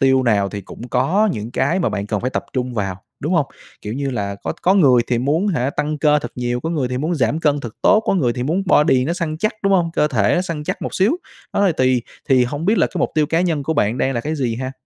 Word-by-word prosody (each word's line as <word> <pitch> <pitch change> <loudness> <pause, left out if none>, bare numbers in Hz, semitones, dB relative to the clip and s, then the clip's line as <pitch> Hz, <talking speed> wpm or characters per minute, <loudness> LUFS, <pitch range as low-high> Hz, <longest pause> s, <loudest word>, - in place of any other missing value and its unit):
tiêu 130 -1 +4
nào 100 -5 +2
thì 100 0 -6
cũng 120 +5 -10
có 165 - +2
những 110 +2 -5
cái 170 +7 +1
mà - - +1
bạn 100 -1 -3
cần 105 -1 -2
phải 125 - -2
tập - - -3
trung 125 -1 -2
vào, 95 -4 -2 0.2
đúng - - -2
hông? - - +2 0.4
Kiểu 105 - -4
như 140 +1 -2
là, 100 -4 -3
có - - -2
có 190 +2 +4
người 130 -10 +5
thì 120 - 0
muốn 150 - +1
hả, 135 -7 0
tăng 150 +1 -2
cơ 150 0 +4
thật 145 - -7
nhiều, 120 0 -2
có 160 - -3
người 145 -7 -1
thì 125 0 -2
muốn 160 +5 -1
giảm 150 +1 +1
cân 145 -2 +1
thật 115 -5 -7
tốt, 215 - +5
có - - +2
người 130 -11 +1
thì 125 - -4
muốn 165 +9 0
body 150 -7 +4
nó 165 - -1
săn 165 -3 -3
chắc, 215 +5 0
đúng 195 0 +2
hông? 175 -3 +2
Cơ 150 -2 +2
thể 110 -8 +2
nó 180 - +1
săn 165 -5 -5
chắc 185 +4 -3
một - - -4
xíu, 195 +8 +3 0.4
đó, 200 - +2
thì 180 - +3
tùy, 130 -2 +2 0.3
thì 130 -2 +5
hông 145 +6 -4
biết 210 +5 +2
là - - +4
cái 180 - -6
mục - - 0
tiêu 155 -1 +2
cá 165 +3 +1
nhân 165 -5 0
của 160 +4 -1
bạn 110 0 +1
đang 135 - +1
là 120 - 0
cái 155 +6 -3
gì 125 -6 -1
ha? 130 +2 -4
140 Hz, 295 wpm, -20 LUFS, 125-165 Hz, 0.4 s, người